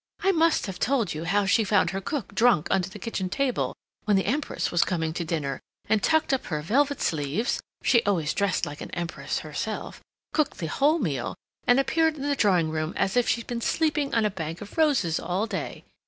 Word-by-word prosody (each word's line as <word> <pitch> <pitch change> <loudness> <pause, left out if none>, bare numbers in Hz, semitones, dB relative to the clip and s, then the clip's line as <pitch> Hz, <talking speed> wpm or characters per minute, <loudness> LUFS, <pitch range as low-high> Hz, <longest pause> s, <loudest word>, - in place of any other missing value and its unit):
"I 390 - +5
must 330 -2 +3
have 190 -4 -6
told 240 -9 +1
you 155 +2 -5
how 200 +4 +2
she 200 +3 +3
found 205 -1 +2
her 195 0 -3
cook 240 -1 -4
drunk 225 -6 +4
under 185 -1 +1
the 190 - -9
kitchen 195 -2 -3
table 260 +5 -1 0.3
when 210 -2 +4
the 190 - +1
Empress 280 +8 -1
was 175 - +4
coming 160 -3 -1
to 170 - -2
dinner, 155 -4 -2 0.3
and 220 -1 +2
tucked 315 +1 +2
up 265 - -1
her 150 -3 -2
velvet 280 - +2
sleeves 155 - -1 0.2
(she 235 -3 +5
always 175 -8 0
dressed 200 -3 +1
like 145 - -8
an - - -6
Empress 170 -1 -3
herself), - - -5 0.3
cooked 305 -2 +1
the 165 - -4
whole 285 - +2
meal, 145 - -2 0.3
and 245 +2 +6
appeared 315 +4 +2
in 280 - -6
the 285 0 +1
drawing 180 - +3
room 155 +1 -2
as 190 - +1
if 245 -1 +3
she'd 235 - 0
been 240 -1 -4
sleeping 300 0 +1
on 225 -2 +3
a 210 - +1
bank 165 -3 -5
of 205 - -10
roses 275 - +2
all 185 +4 -1
day. 190 -9 -5
205 Hz, 215 wpm, -26 LUFS, 170-270 Hz, 0.3 s, and